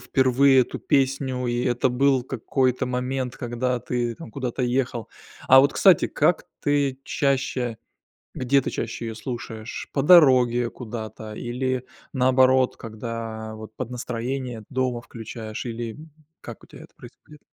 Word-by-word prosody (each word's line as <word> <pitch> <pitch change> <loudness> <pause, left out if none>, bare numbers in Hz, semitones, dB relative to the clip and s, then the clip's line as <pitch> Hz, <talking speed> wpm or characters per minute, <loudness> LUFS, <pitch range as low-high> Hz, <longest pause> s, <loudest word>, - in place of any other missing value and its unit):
впервые 130 0 +4
эту 125 - -2
песню, 135 -2 0
и 120 0 -1
это 125 +1 +1
был 130 +1 +2
какой-то 130 0 0
момент, 125 0 -2
когда 125 0 -2
ты 120 -1 -2
там 165 - -11
куда-то 130 -2 -3
ехал. 125 -2 -1 0.4
А 130 +1 +9
вот, 140 +2 +3
кстати, 190 -5 +5
как 155 +3 +1 0.2
ты 140 -2 0
чаще, 130 -5 -1 0.6
где 135 +2 +2
ты - - -3
чаще 115 0 -4
её 110 - -5
слушаешь? 110 -1 -6
По 135 - 0
дороге 130 -7 +6
куда-то, 110 -2 -7
или 130 +2 -3 0.3
наоборот, 130 0 +3
когда 110 -1 -6
вот 110 0 -10
под 130 -2 -5
настроение 125 -1 -4
дома 130 -2 -1
включаешь, 110 -1 -7
или, 115 -1 -4
м, 155 +1 -13 0.3
как - - -10
у - - -19
тебя - - -13
это - - -18
происходит? 150 - -15
125 Hz, 145 wpm, -24 LUFS, 120-130 Hz, 0.6 s, А